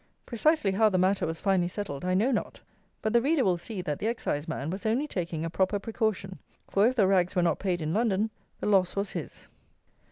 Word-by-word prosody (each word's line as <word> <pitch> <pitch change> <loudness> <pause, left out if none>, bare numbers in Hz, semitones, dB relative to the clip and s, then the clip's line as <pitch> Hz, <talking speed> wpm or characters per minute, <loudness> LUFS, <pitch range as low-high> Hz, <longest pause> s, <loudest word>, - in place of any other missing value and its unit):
Precisely 245 -2 +2
how 215 +3 +4
the 185 - 0
matter 190 +1 +2
was 160 0 -4
finally 190 -3 +2
settled 180 -6 -5
I 185 0 +1
know 225 +8 +2
not; 240 - -2 0.4
but 220 - 0
the 235 - +5
reader 285 +1 +2
will 185 -4 +2
see 185 +1 -5
that 150 -5 -3
the 215 - -1
Exciseman 160 - -2
was 190 +2 -5
only 230 +7 +1
taking 170 - -3
a - - -2
proper 190 +3 +1
precaution; 205 -3 -2 0.3
for 200 +3 +3
if 255 - 0
the 215 -6 +4
rags 185 -1 +2
were 180 - +3
not 170 - +1
paid 180 -4 -1
in 155 +1 -1
London, 215 0 +1 0.3
the - - -4
loss 195 -3 +3
was 200 0 -2
his. - - -7
195 Hz, 220 wpm, -28 LUFS, 180-220 Hz, 0.4 s, the